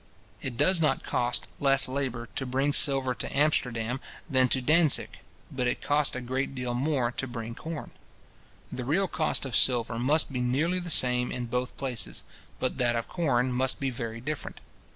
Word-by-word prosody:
It 120 Hz, -3 st, -5 dB
does 165 Hz, +5 st, +4 dB
not 155 Hz, -, +1 dB
cost 120 Hz, 0 st, 0 dB
less 135 Hz, -1 st, +4 dB
labour 130 Hz, -3 st, -3 dB
to -, -, -2 dB
bring 135 Hz, +3 st, +1 dB
silver 135 Hz, -3 st, +4 dB
to 135 Hz, -, -5 dB
Amsterdam 125 Hz, -5 st, +1 dB, 0.3 s
than 130 Hz, -4 st, +3 dB
to 130 Hz, -, +1 dB
Dantzic; 155 Hz, +3 st, +2 dB, 0.3 s
but 125 Hz, -2 st, -1 dB
it -, -, -1 dB
costs 145 Hz, -2 st, +1 dB
a 130 Hz, -, -3 dB
great 130 Hz, +2 st, -2 dB
deal 125 Hz, -1 st, -3 dB
more 130 Hz, -1 st, 0 dB
to 135 Hz, -, -4 dB
bring 115 Hz, -2 st, -6 dB
corn. 160 Hz, +5 st, -7 dB, 0.8 s
The 125 Hz, -, -4 dB
real 170 Hz, +10 st, +1 dB
cost 155 Hz, -4 st, 0 dB
of 130 Hz, -5 st, -3 dB
silver 115 Hz, 0 st, +3 dB
must 145 Hz, +3 st, +1 dB
be 125 Hz, -, -1 dB
nearly 150 Hz, +9 st, +1 dB
the 175 Hz, -1 st, -6 dB
same 125 Hz, -4 st, +4 dB
in 125 Hz, -1 st, -3 dB
both 125 Hz, +2 st, -3 dB
places; 125 Hz, -4 st, -3 dB, 0.4 s
but -, -, -2 dB
that 120 Hz, -1 st, +2 dB
of 115 Hz, -, -2 dB
corn 130 Hz, -7 st, +1 dB
must 130 Hz, +1 st, 0 dB
be 135 Hz, -1 st, -1 dB
very 115 Hz, -2 st, -5 dB
different. 150 Hz, +5 st, -5 dB
130 Hz, 180 wpm, -28 LUFS, 125-145 Hz, 0.8 s, does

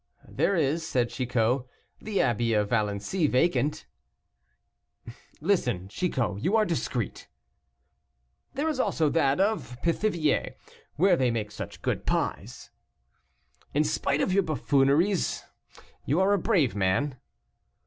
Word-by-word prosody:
"There 200 Hz, -, +1 dB
is," 160 Hz, 0 st, +1 dB
said 125 Hz, -6 st, 0 dB
Chicot, 125 Hz, 0 st, 0 dB, 0.4 s
"the 215 Hz, -2 st, 0 dB
abbey 120 Hz, -2 st, +1 dB
of 105 Hz, -1 st, +1 dB
Valency 110 Hz, -, 0 dB
vacant." 150 Hz, -, +1 dB, 1.5 s
"Listen, 125 Hz, -, 0 dB
Chicot, 115 Hz, -, -2 dB
you 195 Hz, +5 st, +2 dB
are 220 Hz, -1 st, +4 dB
discreet." 135 Hz, -, -3 dB, 1.3 s
"There 290 Hz, +4 st, -1 dB
is 305 Hz, -4 st, -1 dB
also 160 Hz, -, +1 dB
that 140 Hz, -3 st, +2 dB
of 195 Hz, -, 0 dB
Pithiviers, 170 Hz, -2 st, 0 dB, 0.4 s
where 180 Hz, +6 st, +4 dB
they 130 Hz, -6 st, +1 dB
make 110 Hz, -3 st, -2 dB
such -, -, -8 dB
good -, -, -2 dB
pies." -, -, -3 dB, 1.0 s
"In 150 Hz, -, +4 dB
spite 145 Hz, -1 st, 0 dB
of 185 Hz, -, +1 dB
your 200 Hz, -, +4 dB
buffooneries, 155 Hz, +3 st, +1 dB, 0.6 s
you 150 Hz, +6 st, +2 dB
are 195 Hz, +2 st, +3 dB
a 200 Hz, -, +2 dB
brave 165 Hz, -, +1 dB
man." 105 Hz, +8 st, 0 dB
145 Hz, 120 wpm, -27 LUFS, 120-180 Hz, 1.5 s, are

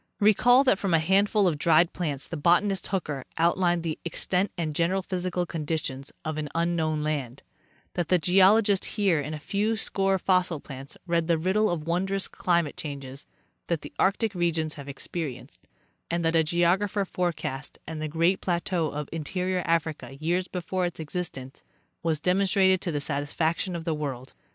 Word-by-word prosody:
Recall 245 Hz, +5 st, +5 dB
that 255 Hz, -8 st, +3 dB
from 190 Hz, -4 st, +1 dB
a -, -, +6 dB
handful 200 Hz, +5 st, +3 dB
of 155 Hz, -4 st, 0 dB
dried 165 Hz, +1 st, +4 dB
plants 150 Hz, -6 st, -3 dB
the 170 Hz, -, -5 dB
botanist 175 Hz, +5 st, +2 dB
Hooker 150 Hz, -8 st, -2 dB
outlined 175 Hz, 0 st, +2 dB
the 160 Hz, -2 st, -3 dB
extent 180 Hz, +3 st, 0 dB
and 160 Hz, -3 st, -2 dB
general 180 Hz, +5 st, +1 dB
physical 180 Hz, -1 st, -2 dB
conditions 150 Hz, -4 st, -3 dB
of 155 Hz, -1 st, -2 dB
an 150 Hz, -1 st, -4 dB
un 170 Hz, +1 st, +1 dB
known 155 Hz, -2 st, 0 dB
land; 140 Hz, -5 st, -3 dB, 0.5 s
that 175 Hz, -3 st, -1 dB
the 180 Hz, -, +4 dB
geologist 195 Hz, +3 st, +4 dB
Heer 190 Hz, -7 st, +3 dB
in 150 Hz, +2 st, -4 dB
a -, -, -7 dB
few 210 Hz, +8 st, 0 dB
score 195 Hz, -2 st, +1 dB
fossil 180 Hz, -3 st, +1 dB
plants 135 Hz, -1 st, -9 dB
read 170 Hz, -2 st, +1 dB
the 170 Hz, -1 st, +3 dB
riddle 190 Hz, +6 st, +2 dB
of 160 Hz, -3 st, -2 dB
wondrous 190 Hz, +3 st, 0 dB
climatic 170 Hz, -4 st, 0 dB
changes 140 Hz, -2 st, -7 dB, 0.4 s
that 170 Hz, -3 st, -1 dB
the 145 Hz, -, -10 dB
arctic 200 Hz, +2 st, +2 dB
re 175 Hz, -2 st, +1 dB
gions 155 Hz, -1 st, -2 dB
have 140 Hz, -1 st, -9 dB
experienced, 140 Hz, 0 st, -6 dB, 0.4 s
and 170 Hz, 0 st, -1 dB
that 165 Hz, +1 st, +2 dB
a 160 Hz, -, +5 dB
geographer 180 Hz, +5 st, +1 dB
forecast 165 Hz, -7 st, -3 dB
the 155 Hz, -1 st, -4 dB
great 165 Hz, +5 st, +1 dB
plateau 175 Hz, -2 st, 0 dB
of 150 Hz, 0 st, -4 dB
interior 180 Hz, +3 st, -2 dB
Africa 160 Hz, -4 st, -1 dB
years 175 Hz, +4 st, 0 dB
before 180 Hz, 0 st, -2 dB
its 175 Hz, -, -7 dB
existence 150 Hz, -5 st, -5 dB, 0.4 s
was 160 Hz, -3 st, 0 dB
demon 185 Hz, +4 st, +2 dB
strated 190 Hz, -1 st, +4 dB
to 175 Hz, -, -2 dB
the 145 Hz, -, -1 dB
satisfaction 160 Hz, +5 st, -1 dB
of 165 Hz, -1 st, -5 dB
the 165 Hz, -, 0 dB
world. 135 Hz, -4 st, -5 dB
170 Hz, 175 wpm, -27 LUFS, 155-185 Hz, 0.5 s, a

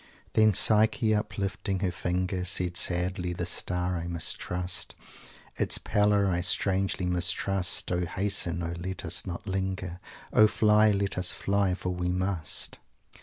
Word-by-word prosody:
"Then 110 Hz, -2 st, +4 dB
Psyche, 110 Hz, +2 st, +4 dB
uplifting 100 Hz, -2 st, -2 dB
her 95 Hz, -3 st, 0 dB
finger, 90 Hz, +1 st, -2 dB
Said, 90 Hz, -1 st, 0 dB
'sadly 90 Hz, 0 st, 0 dB
this 85 Hz, 0 st, -3 dB
star 90 Hz, 0 st, -2 dB
I 85 Hz, 0 st, -5 dB
mistrust, 90 Hz, +1 st, -1 dB, 0.6 s
Its -, -, +1 dB
pallor 105 Hz, -1 st, +2 dB
I 90 Hz, -2 st, 0 dB
strangely 95 Hz, +1 st, +1 dB
mistrust. 90 Hz, +1 st, +1 dB
O 90 Hz, -1 st, -1 dB
hasten! 90 Hz, -2 st, -1 dB
O 85 Hz, 0 st, -3 dB
let 95 Hz, +1 st, -5 dB
us -, -, -1 dB
not 90 Hz, +1 st, -6 dB
linger! 95 Hz, -2 st, -3 dB, 0.3 s
O 110 Hz, -, +7 dB
fly! 105 Hz, 0 st, +4 dB
Let 100 Hz, -2 st, -1 dB
us 90 Hz, -, 0 dB
fly! 100 Hz, -2 st, 0 dB
for 90 Hz, -, -4 dB
we 90 Hz, 0 st, -2 dB
must!'" 90 Hz, -3 st, -1 dB
90 Hz, 140 wpm, -28 LUFS, 90-100 Hz, 0.6 s, O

